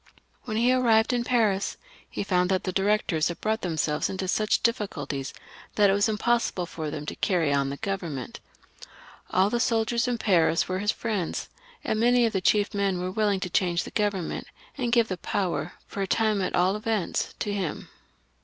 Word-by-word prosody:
When 215 -4 -3
he 245 +3 +4
arrived 235 -2 +3
in 240 -1 +1
Paris 220 -6 +1 0.3
he - - -3
found 180 -2 +1
that 190 -1 +1
the 185 - -2
Directors 195 -4 +1
had 170 - -5
brought 220 +1 -1
themselves 155 -3 -1
into 190 0 -3
such 215 +3 +1
difficulties 145 - -2 0.4
that 205 -2 +5
it - - +3
was 205 +2 +2
impossible 220 -4 0
for 160 -3 -5
them 150 0 -5
to - - -5
carry 170 -7 +1
on 140 -1 +1
the 140 - -5
Grovernment. 170 -10 -4 0.9
All 190 +2 +2
the 240 - +1
soldiers 235 0 +1
in 245 -1 0
Paris 170 -7 +2
were 185 0 -2
his 205 +2 +1
friends, 210 -7 -3 0.3
and 215 - -1
many 245 +1 +4
of 225 - 0
the 190 - 0
chief 205 +2 +2
men 200 -3 0
were 180 +1 -3
willing 205 -1 +1
to 185 - -2
try 185 - +2
and 175 -1 -2
change 170 - +2
the - - -9
Government, 205 -5 -2 0.3
and 245 -4 -2
give 235 -2 +4
the 185 - -3
power, 185 0 -2
for 200 - -6
a 195 - -1
time 215 0 +1
at 185 - -1
all 185 +3 +3
events, 215 -3 -2
to 205 - -2
him. 190 -6 -3
200 Hz, 200 wpm, -26 LUFS, 180-220 Hz, 0.9 s, that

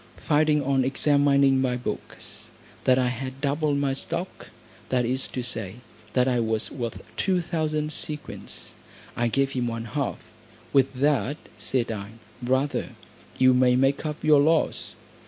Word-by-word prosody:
Finding 150 -1 +2
on 135 -1 +2
examining 140 0 +3
my 125 -2 +1
books, 125 - -6 0.4
that 130 -1 +5
I 125 -1 +2
had 130 +2 -5
doubled 145 +1 +1
my 140 -1 +1
stock, 135 - -3 0.4
that 125 -2 +2
is 130 +3 0
to 125 - -4
say, 110 -5 -3 0.4
that 125 0 +3
I 125 -2 +2
was 110 -1 -1
worth 120 -4 -5
two 190 -2 +2
thousand 155 -3 -1
sequins, 150 0 -3 0.4
I 120 - +1
gave 135 +3 +1
him 125 -3 -1
one 115 0 -4
half; 140 +5 -2 0.6
"With 135 -1 +4
that," 145 +1 +1 0.2
said 120 -3 0
I, 100 0 -6 0.3
"brother, 130 +3 0 0.4
you 130 0 +6
may 125 0 +4
make 135 +2 +2
up 150 -1 -4
your 150 -2 +6
loss." 160 +2 +1
135 Hz, 150 wpm, -25 LUFS, 125-145 Hz, 0.6 s, you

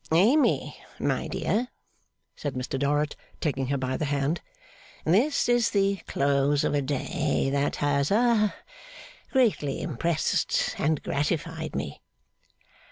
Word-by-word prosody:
'Amy, 225 - +3 0.2
my - - -1
dear,' 240 +3 -1 0.7
said 145 -3 -4
Mr 130 +1 -3
Dorrit, 145 +2 +1 0.2
taking 135 -4 -1
her 140 +1 0
by 130 0 -2
the 155 - -1
hand, 145 +3 0 0.6
'this 230 - +3
is 240 -2 +3
the 200 -1 +2
close 140 +1 +2
of - - +1
a 145 - +2
day, 135 0 -1
that 140 +1 0
has 140 -1 +1
ha 215 -1 +3 0.8
greatly 215 - +2
impressed 160 +2 0
and 155 0 +1
gratified 160 +2 -2
me. 70 - -4
150 Hz, 120 wpm, -27 LUFS, 140-195 Hz, 0.8 s, Amy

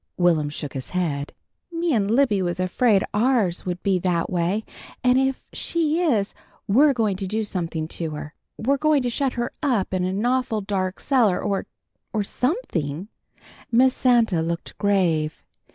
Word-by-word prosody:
Will'm 165 -4 +3
shook 145 -1 -6
his 130 -2 -5
head. 150 -6 -2 0.4
"Me 335 -1 0
an' 205 -4 +2
Libby 225 -3 +3
was 175 -1 -2
afraid 195 +2 +3
ours 215 -6 +1
would 180 0 -3
be 190 -2 +2
that 175 -2 0
way, 180 +5 0 0.4
and 250 +1 +4
if 265 0 -1
she 330 0 0
is 225 - +1 0.3
we're 280 +9 +5
going 220 -6 0
to 195 0 -4
do 220 +3 -1
something 170 -5 -3
to 165 -2 -4
her. 150 0 -7 0.2
We're 275 +5 +1
going 305 -2 +3
to 245 - -1
shut 270 +2 0
her 240 -1 -3
up 240 -10 0
in 185 -1 0
a 185 - 0
nawful 235 +2 0
dark 190 -2 -2
cellar, 235 -10 +2
or 200 -2 -2 0.5
or 215 -2 +1
something." 195 - -2 0.6
Miss 255 +2 +5
Santa 235 -11 +3
looked 170 +1 -4
grave. 170 -7 +1
200 Hz, 165 wpm, -23 LUFS, 175-250 Hz, 0.6 s, we're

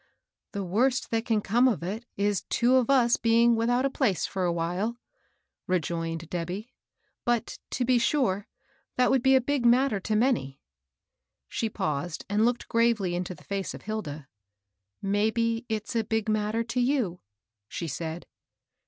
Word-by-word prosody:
" - - -63
The 200 -2 -2
worst 245 +8 +1
that 225 0 0
can 220 -3 +2
come 240 +6 +3
of 220 -9 0
it 215 +7 -4
is 200 -1 +1
two 245 +2 +3
of 255 -1 +1
us 245 -4 +4
being 230 +1 +4
without 245 +3 +1
a - - +2
place 235 - +1
for 190 -2 -2
a 175 - +2
while," 180 +7 -2 0.7
rejoined 165 -2 -2
Debby. 180 +7 -5 0.2
" - - -47
But, 240 -1 -1
to 250 - -1
be 250 0 +4
sure, 230 -7 +1 0.5
that 250 0 +3
would 265 - +3
be 265 +1 +5
a - - +6
big 275 0 -1
matter 240 -2 +4
to 215 +3 -2
many." 215 - +1 0.9
She 225 - -2
paused 155 -2 -3
and 205 +2 +2
looked 245 0 0
gravely 230 -6 +2
into 180 +1 -3
the - - -18
fiwe 195 -2 -3
of - - -11
Hilda. 155 -10 -5 0.4
" 100 +1 -57 0.2
Maybe 230 +2 0
it's 215 +1 -3
a 225 - +2
big 220 -1 -1
matter 215 +1 0
to 235 +2 -3
you," 245 -9 0 0.5
she 170 - -5
said. 160 +4 -5
220 Hz, 170 wpm, -27 LUFS, 180-240 Hz, 0.9 s, a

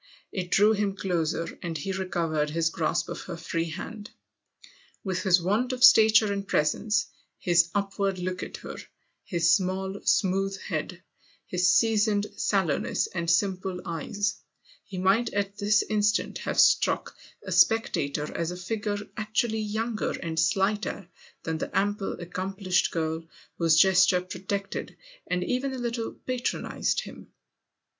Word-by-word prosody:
It 185 -3 -4
drew 210 +4 +5
him 205 -2 0
closer, 170 -3 -2
and 170 -2 -3
he 170 +7 -4
recovered 170 -5 -1
his 165 +1 0
grasp 160 -2 -1
of - - -6
her 170 - -7
free 165 0 -2
hand. 205 +6 -7 0.9
With 185 -2 -2
his 185 -2 +4
want 215 +9 0
of 250 0 -2
stature 220 -4 +7
and 200 0 -4
presence, 210 +8 +1 0.3
his 170 -1 +3
upward 195 -1 -1
look 185 +1 -3
at - - -6
her, - - -7 0.5
his 170 -3 +2
small, 190 +2 -1
smooth 195 0 +1
head, 170 +2 -4 0.4
his 180 0 +2
seasoned 215 -2 +3
sallowness 190 -8 0
and 170 -2 -2
simple 185 0 +1
eyes, 200 +5 -2 0.5
he 190 - -9
might 195 +6 +2
at 200 0 -2
this 210 +1 +3
instant 210 0 0
have - - -2
struck - - +3 0.3
a - - -7
spectator 150 -10 +2
as 165 -1 -1
a 180 - -5
figure 205 +2 -3 0.2
actually 220 0 0
younger 220 +1 -2
and 165 -1 -2
slighter 195 +2 0 0.3
than 160 -1 -3
the - - -3
ample, 205 0 0
accomplished 185 +1 -1
girl 160 0 -2 0.4
whose 165 -2 +4
gesture 185 0 +5
protected 195 +2 -5 0.3
and 180 0 0
even 260 +6 -1
a - - -5
little 235 -2 -3
patronised 255 -1 -2
him. - - -11
190 Hz, 140 wpm, -27 LUFS, 175-210 Hz, 0.9 s, stature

